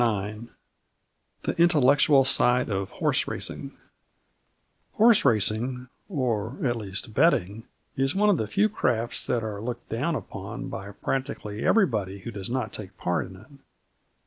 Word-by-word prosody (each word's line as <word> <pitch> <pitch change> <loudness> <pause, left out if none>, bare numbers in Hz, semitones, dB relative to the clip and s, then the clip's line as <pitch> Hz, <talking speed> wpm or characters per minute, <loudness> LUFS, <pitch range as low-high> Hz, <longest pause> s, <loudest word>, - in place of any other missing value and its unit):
IX 105 -1 -1 1.0
THE - - -2
INTELLECTUAL 145 -4 +5
SIDE 125 -2 +3
OF 95 -1 -2
HORSE - - 0
RACING - - -4 1.2
Horse 225 0 +5
racing 125 +2 +1 0.2
or, 125 - -1
at 120 -2 +1
least, 105 0 -6
betting 115 - +2 0.3
is 135 +3 0
one 210 +1 +4
of 190 - +2
the 110 - -2
few 200 - +2
crafts 120 - -1
that 120 -2 0
are 105 -2 -4
looked 120 +1 -6
down 140 +9 -1 0.2
on - - -6
by 100 - -6
practically 110 -1 -4
everybody 105 - +1
who 115 - -6
does 100 -2 -6
not 120 -4 -2
take 100 -4 -9
part 90 0 -1
in 95 - -12
it. 100 +4 -16
120 Hz, 145 wpm, -26 LUFS, 105-135 Hz, 1.2 s, INTELLECTUAL